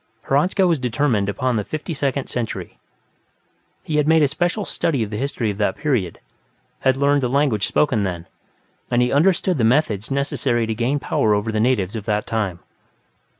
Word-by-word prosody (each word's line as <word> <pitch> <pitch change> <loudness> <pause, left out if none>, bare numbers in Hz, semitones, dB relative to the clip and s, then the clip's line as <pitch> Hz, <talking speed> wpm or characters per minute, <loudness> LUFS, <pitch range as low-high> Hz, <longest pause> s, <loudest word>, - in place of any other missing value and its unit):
Hradzka 180 +8 +2
was 170 -4 +2
determined 125 -5 0
upon 120 +4 -1
the 105 - -1
Fifty 155 - -5
Second 140 -2 -1
Century; 120 -3 -5 1.0
he 150 - -2
had 150 0 +2
made 160 -1 +5
a - - +5
special 175 +8 -1
study 140 -8 -1
of 105 - -6
the - - -3
history 130 -4 -1
of 100 - -8
that 100 -2 0
period, 125 - -1 0.6
had 130 0 +2
learned 140 +1 +3
the 125 - 0
language 130 -7 +1
spoken 135 -8 +1
then, 90 -4 -3 0.6
and 120 0 +3
he 125 - 0
understood 175 +2 +2
the - - +2
methods 110 -4 +1
necessary 135 -3 0
to 110 - -2
gain 120 +6 0
power 110 -5 +1
over 105 +2 -1
the 110 - -1
natives 110 -4 +1
of 105 -2 -5
that 105 -2 0
time. 100 -6 -2
125 Hz, 185 wpm, -21 LUFS, 110-145 Hz, 1.0 s, made